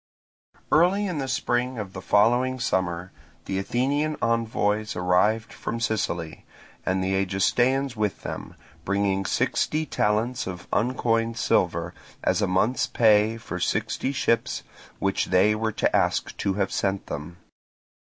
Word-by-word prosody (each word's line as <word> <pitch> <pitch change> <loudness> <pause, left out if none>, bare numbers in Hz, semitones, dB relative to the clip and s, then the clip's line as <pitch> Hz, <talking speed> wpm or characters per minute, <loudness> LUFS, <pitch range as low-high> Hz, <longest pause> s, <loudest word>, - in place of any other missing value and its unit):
Early 180 +6 +4
in 180 -6 -2
the 135 - -2
spring 130 -2 -1
of 100 -3 -5
the 95 - -6
following 120 +6 +3
summer 90 -5 -1 0.3
the 95 - -2
Athenian 140 +9 0
envoys 110 -2 0
arrived 90 +5 +1
from 115 - -4
Sicily, 95 -8 -2 0.4
and 95 0 0
the 95 +1 0
Egestaeans 120 +8 +1
with 105 -2 -2
them, - - -6 0.3
bringing 100 0 0
sixty 155 +1 0
talents 115 -1 0
of 90 -2 -7
uncoined 115 0 +1
silver, - - +1 0.3
as - - +2
a 100 - +2
month's 95 +7 +1
pay 110 0 +4
for 115 - -6
sixty 135 - -1
ships, 115 -4 0 0.3
which 95 0 0
they 95 +3 +4
were 110 +1 -1
to - - +1
ask - - +1
to 95 - -1
have 100 -1 0
sent 95 0 -1
them. 75 +4 -6
110 Hz, 135 wpm, -25 LUFS, 95-125 Hz, 0.4 s, Early